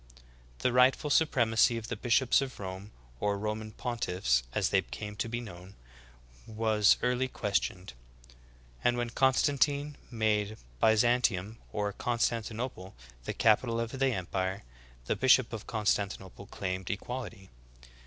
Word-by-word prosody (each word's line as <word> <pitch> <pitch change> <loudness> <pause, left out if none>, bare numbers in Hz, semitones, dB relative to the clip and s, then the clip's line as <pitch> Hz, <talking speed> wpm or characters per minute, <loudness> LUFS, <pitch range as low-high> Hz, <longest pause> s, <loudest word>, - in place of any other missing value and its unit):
The 125 - +3
rightful 130 +4 +4
supremacy 120 -6 +3
of 115 -1 -6
the 120 - -2
bishops 120 +4 +3
of 135 -2 -5
Rome, 95 +1 -6 0.3
or 100 -1 0
Roman 110 +1 -4
pontiffs 90 - 0
as - - 0
they - - +3
came 105 +13 -7
to 115 - -2
be 120 +1 -2
known, 95 -4 -10 0.7
was 110 -1 +3
early 125 +1 +1
ques 105 -5 0
tioned; 90 -5 -6 0.9
and 120 0 +2
when 120 -1 -2
Constantine 140 +2 +2
made 110 -2 0 0.2
Byzantium, 110 - +2
or 105 -1 -2
Con 120 +3 -2
stantinople, 115 -3 -2 0.3
the - - -3
capital 115 +1 +3
of 115 0 -2
the 135 - +3
empire, 95 -3 -2 0.4
the - - 0
bishop 130 -2 +4
of 110 -1 -6
Constan 105 -2 0
tinople 95 +1 -13
claimed 95 -1 -4
equality. 105 -1 -6
110 Hz, 135 wpm, -30 LUFS, 100-125 Hz, 0.9 s, rightful